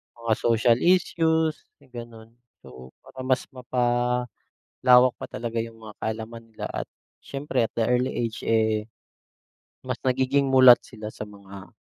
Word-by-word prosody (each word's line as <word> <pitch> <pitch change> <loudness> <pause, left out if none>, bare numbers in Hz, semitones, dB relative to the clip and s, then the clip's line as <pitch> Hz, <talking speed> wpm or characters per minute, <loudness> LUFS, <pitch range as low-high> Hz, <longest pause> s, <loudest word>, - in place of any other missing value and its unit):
Mga 115 -1 -1
social 115 0 +3
issues, 160 -3 +1
may 135 -3 -24
ganun. 115 -2 -10 0.3
So, 65 -1 -13
para - - -14
mas 130 0 0
mapalawak 125 -1 -2 0.8
pa - - -5
talaga 115 0 -4
yung 115 0 -7
mga 105 - -10
kaalaman 110 +1 -5
nila 110 - -7
at - - -5 0.3
siyempre 135 -2 -3
at - - -58
the 115 - +1
early 125 +2 +1
age, 115 -1 -3
eh, 110 -1 +1 1.0
mas 130 -1 -4
nagiging 130 +1 +1
mulat 130 -2 +8
sila 110 -2 -9
sa - - -7
mga, 100 -1 -12
120 Hz, 140 wpm, -25 LUFS, 110-130 Hz, 1.0 s, mulat